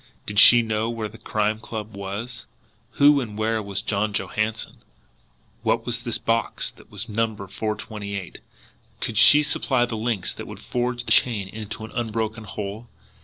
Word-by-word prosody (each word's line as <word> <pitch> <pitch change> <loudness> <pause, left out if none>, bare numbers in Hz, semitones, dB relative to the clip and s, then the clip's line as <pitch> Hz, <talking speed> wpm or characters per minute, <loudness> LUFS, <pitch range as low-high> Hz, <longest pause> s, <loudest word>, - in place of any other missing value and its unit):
Did 105 0 +2
she 120 +1 +9
know 110 0 -1
where 115 -2 -3
the 115 +2 -14
Crime 110 0 0
Club 110 -2 -6
was? 105 +5 -5 0.5
Who 145 0 +6
and 105 -4 -6
where 110 0 +1
was 100 -1 -4
John 105 0 0
Johansson? 110 +2 -2 0.8
What 115 0 +1
was 120 0 -1
this 120 -2 -1
box 115 0 -1
that - - -19
was - - -5
numbered 105 -3 -2
428? 100 -3 -4 0.6
Could 110 -2 -1
she 150 0 +8
supply 130 -4 +1
the 115 - -4
links 110 -4 -1
that - - -8
would - - -8
forge 120 0 -2
the - - -3
chain 110 -6 +4
into 110 +1 -6
an - - -11
unbroken 110 -1 -2
whole? 105 +3 -6
110 Hz, 165 wpm, -24 LUFS, 105-115 Hz, 0.8 s, she